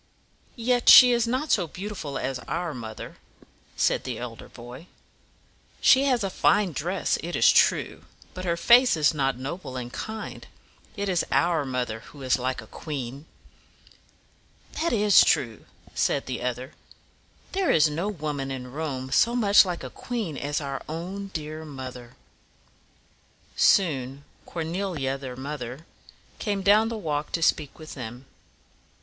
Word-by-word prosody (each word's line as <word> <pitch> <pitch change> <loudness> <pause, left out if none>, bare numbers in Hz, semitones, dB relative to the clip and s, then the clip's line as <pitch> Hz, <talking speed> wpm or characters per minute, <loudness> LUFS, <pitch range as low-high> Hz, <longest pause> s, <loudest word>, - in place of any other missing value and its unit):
"Yet 245 0 +2
she 250 -1 +10
is 235 -1 +2
not 260 +6 -1
so 180 -5 +2
beautiful 180 -5 -6
as 130 -1 -3
our 170 -2 -2
mother," 110 -3 -8 0.6
said - - +1
the - - -4
elder - - -8
boy. 120 +8 -11 0.9
"She 265 +1 +5
has 250 -5 +2
a 195 - -2
fine 205 0 +2
dress, 175 +6 -1
it 175 +2 -4
is - - +6
true; - - +2 0.3
but 185 - -7
her 170 -2 0
face 245 +1 +5
is 155 +1 +3
not 135 -4 0
noble 135 0 -6
and 120 -1 -6
kind. 220 0 -6 0.5
It 200 0 -2
is 180 -3 +1
our 170 -4 +2
mother 125 -4 -3
who 135 +4 -13
is 130 0 +2
like 130 -1 -2
a - - -12
queen." 140 +2 -7 1.5
"That 335 - +1
is 210 -3 +6
true," 115 -5 0 0.3
said 140 - 0
the 130 -2 -4
other. 125 +1 -4 0.8
"There 385 -1 0
is 155 -1 +5
no 160 +6 -2
woman 150 -7 -4
in 125 -2 -6
Rome 135 -3 -4
so 235 - +3
much 210 -4 +6
like 180 -2 -4
a - - -7
queen 225 - -4
as 145 +1 -2
our 140 -2 -5
own 185 +5 -5
dear 155 -3 -6
mother." 130 -4 -9 1.4
Soon 140 -7 +2 0.2
Cor 165 - -4
ne´li 165 -5 -2
a, - - -2
their 135 -2 -7
mother, 135 +1 -6 0.5
came 205 -3 -2
down 215 +3 +5
the 230 - -4
walk 150 -6 -3
to 165 - 0
speak 150 -3 +1
with 155 -1 -10
them. 125 0 -8
155 Hz, 155 wpm, -26 LUFS, 130-195 Hz, 1.5 s, she